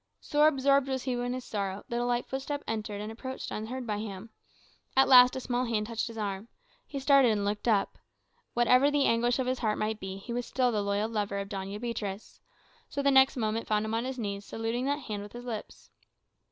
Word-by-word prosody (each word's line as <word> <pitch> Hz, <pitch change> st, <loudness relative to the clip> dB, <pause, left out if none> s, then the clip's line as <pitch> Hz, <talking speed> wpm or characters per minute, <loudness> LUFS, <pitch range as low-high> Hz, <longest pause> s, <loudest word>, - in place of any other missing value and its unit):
So 295 Hz, +1 st, +3 dB
absorbed 275 Hz, -2 st, +3 dB
was 260 Hz, -2 st, -2 dB
he 260 Hz, -, -2 dB
in 245 Hz, 0 st, -1 dB
his 255 Hz, 0 st, -5 dB
sorrow, 200 Hz, -2 st, -3 dB
that 235 Hz, -1 st, -1 dB
a -, -, 0 dB
light 245 Hz, 0 st, 0 dB
footstep 280 Hz, +2 st, -4 dB
entered 210 Hz, -2 st, -3 dB
and 210 Hz, +1 st, -5 dB
approached 260 Hz, +3 st, -6 dB
unheard 245 Hz, +4 st, -4 dB
by 210 Hz, -2 st, -2 dB
him. 210 Hz, 0 st, -7 dB, 0.7 s
At 270 Hz, -, +6 dB
last 250 Hz, -1 st, +8 dB
a -, -, -2 dB
small 250 Hz, 0 st, -1 dB
hand 220 Hz, -3 st, 0 dB
touched 225 Hz, 0 st, -3 dB
his 230 Hz, -1 st, -8 dB
arm. 200 Hz, 0 st, -3 dB, 0.4 s
He 280 Hz, -, -5 dB
started 275 Hz, -2 st, +5 dB
and 205 Hz, -2 st, 0 dB
looked 205 Hz, +3 st, -2 dB
up. 205 Hz, -4 st, +1 dB, 0.6 s
Whatever 250 Hz, +3 st, +5 dB
his 290 Hz, -, -2 dB
anguish 240 Hz, -3 st, +3 dB
of 255 Hz, -1 st, -1 dB
heart 215 Hz, -3 st, 0 dB
might 215 Hz, 0 st, -2 dB
be, 190 Hz, -1 st, -6 dB
he 215 Hz, +5 st, -7 dB
was 245 Hz, 0 st, -3 dB
still 250 Hz, -1 st, +1 dB
the 210 Hz, -2 st, 0 dB
loyal 200 Hz, +1 st, 0 dB
lover 210 Hz, -3 st, -2 dB
of 200 Hz, 0 st, -4 dB
Doña 195 Hz, 0 st, -5 dB
Beatriz. 215 Hz, -4 st, -5 dB, 0.5 s
So 280 Hz, -, -3 dB
the 280 Hz, -, +4 dB
next 265 Hz, 0 st, +5 dB
moment 220 Hz, -1 st, -1 dB
found 210 Hz, 0 st, +1 dB
him 220 Hz, -, -3 dB
on 230 Hz, +2 st, 0 dB
his 260 Hz, 0 st, -4 dB
knees 200 Hz, -3 st, -3 dB
saluting 225 Hz, +4 st, -3 dB
that 285 Hz, +2 st, 0 dB
hand 210 Hz, -5 st, -5 dB
with 205 Hz, 0 st, -10 dB
his 240 Hz, +1 st, -8 dB
lips. 225 Hz, -4 st, -7 dB
230 Hz, 220 wpm, -29 LUFS, 210-255 Hz, 0.7 s, last